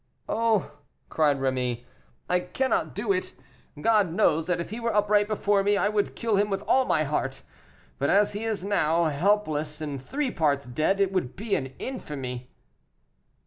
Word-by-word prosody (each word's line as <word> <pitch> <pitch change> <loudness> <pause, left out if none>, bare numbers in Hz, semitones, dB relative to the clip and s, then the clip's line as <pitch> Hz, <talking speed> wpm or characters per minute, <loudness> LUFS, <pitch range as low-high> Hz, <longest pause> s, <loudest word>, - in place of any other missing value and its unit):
"Oh!" 215 -10 0 0.3
cried 150 -3 +2
Rémy, 125 -3 -1 0.4
"I 180 - +2
cannot 260 +9 -1
do - - -1
it. 370 0 -3 0.5
God 215 -6 +3
knows 165 -4 +2
that 180 -1 0
if 170 - -5
he 225 - -4
were 230 0 -1
upright 210 0 +3
before 205 -1 +1
me 205 +1 +2
I 205 - +2
would 210 -1 -1
kill 225 -3 0
him 205 +1 +2
with 195 -1 -2
all 265 0 +3
my 155 - +2
heart; 135 -2 -2 0.6
but 140 - +1
as 205 +1 +3
he 205 +2 -4
is 220 -4 -2
now, 170 -4 +2
helpless 155 -2 0
and 145 -4 -5
three 270 - -2
parts 145 -4 +1
dead, 155 +10 0
it 195 -1 +2
would 180 -10 -2
be 215 0 -4
an 130 -1 -2
infamy." 130 - -6
185 Hz, 175 wpm, -26 LUFS, 145-210 Hz, 0.6 s, God